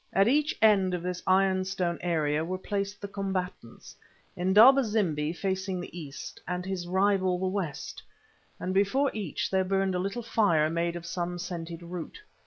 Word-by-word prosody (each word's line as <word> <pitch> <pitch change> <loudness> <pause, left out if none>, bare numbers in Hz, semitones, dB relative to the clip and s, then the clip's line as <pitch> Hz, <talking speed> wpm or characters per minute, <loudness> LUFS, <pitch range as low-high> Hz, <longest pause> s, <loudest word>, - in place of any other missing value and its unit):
At 195 +2 +4
each 295 +4 +2
end 195 -4 +4
of 175 - -5
this 180 0 -3
iron 190 0 +3
stone 185 -3 -2
area 155 -3 0
were 185 +3 -3
placed 200 +1 -3
the 200 - -5
combatants, 190 - -5 0.4
Indaba 220 +10 +6
zimbi 175 -9 0
facing 190 +1 -2
the 175 - -8
east, 150 -5 -8
and 180 +1 -3
his 185 -2 -4
rival 190 0 +2
the 185 - -2
west, 185 -6 -4 0.6
and 185 - -3
before 205 +9 +2
each 200 -9 -3
there 190 -1 +2
burned 195 0 0
a 180 - -1
little 195 +6 -3
fire 165 -9 +2
made 170 +1 -1
of 170 0 -7
some 175 +1 -3
scented 170 -1 -6
root. 170 -1 -7
185 Hz, 170 wpm, -28 LUFS, 175-195 Hz, 0.6 s, Indaba